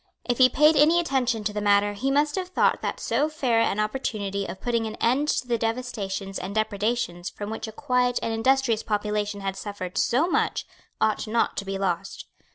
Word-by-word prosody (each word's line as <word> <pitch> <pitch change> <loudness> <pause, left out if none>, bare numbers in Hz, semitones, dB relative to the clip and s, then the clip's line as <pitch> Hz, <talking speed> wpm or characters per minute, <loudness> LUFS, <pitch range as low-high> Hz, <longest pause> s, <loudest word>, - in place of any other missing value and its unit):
If 245 0 -1
he 255 0 +7
paid 300 +5 +5
any 305 +4 +5
attention 255 -8 0
to 210 0 -2
the 210 - -2
matter, 205 0 +3
he 255 +7 -2
must 290 +2 +2
have 375 -1 -2
thought 365 - +1
that - - -3
so 275 +7 0
fair 255 -7 +1
an 215 -2 +1
opportunity 210 -3 -2
of 190 - -7
putting 235 -2 -1
an 220 - -6
end 265 +6 +1
to 255 - 0
the 235 -2 0
devastations 210 -5 -3
and 195 +3 -6
depredations 215 -3 -1
from 205 +1 -7
which 225 - -5
a - - -6
quiet 250 +2 0
and 225 - -1
industrious 235 -1 +2
population 210 -1 -2
had 195 -1 -3
suffered 195 -2 -5
so 275 +8 +2
much 360 - 0 0.3
ought 215 0 +1
not 230 +2 +1
to 200 - -3
be 195 0 -3
lost. 195 0 -3
225 Hz, 200 wpm, -25 LUFS, 205-255 Hz, 0.3 s, he